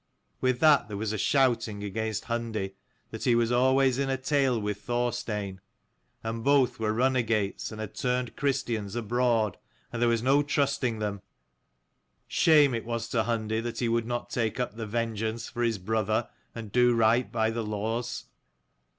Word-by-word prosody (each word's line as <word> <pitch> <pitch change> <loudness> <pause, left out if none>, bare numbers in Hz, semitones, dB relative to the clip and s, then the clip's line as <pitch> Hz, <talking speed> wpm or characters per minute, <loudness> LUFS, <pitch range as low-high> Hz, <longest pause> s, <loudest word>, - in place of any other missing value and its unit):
With 130 -1 +1
that 155 -2 +5
there 105 -2 -5
was 110 +1 -2
a - - -2
shouting 115 -5 +1
against 110 +2 -3
229 115 -4 -3
Hundi, - - -34 0.4
that - - -5
he 120 - +4
was 115 0 +2
always 130 +1 +3
in 140 -1 0
a 135 - 0
tale 135 -2 +1
with 105 -1 -3
Thorstein, 105 -4 -2 0.6
and 115 0 -4
both 140 -3 +3
were 110 -1 0
runagates 115 -5 0
and 110 - -8
had 110 -1 -5
turned 125 -1 -1
Christians 115 -7 -1
abroad, 115 -3 +1 0.3
and 120 - -3
there 120 - +4
was 115 -1 +1
no 135 +3 +4
trusting 140 -5 0
them. 105 -2 -3 1.1
Shame 150 -5 +5
it 115 - -2
was 115 0 -4
to 110 -3 +1
Hundi 110 -1 -1
that 115 0 -5
he 120 - 0
would 115 0 0
not 120 0 -3
take 115 -2 -1
up 125 -4 -2
the 110 -1 -5
vengeance 115 0 -2
for 120 - -5
his 115 -2 +1
brother, 110 +3 -1 0.3
and 110 -3 -7
do 125 +1 +4
right 115 +2 +3
by 110 -1 +1
the 115 0 -3
laws. 110 +3 -3
115 Hz, 175 wpm, -28 LUFS, 110-125 Hz, 1.1 s, that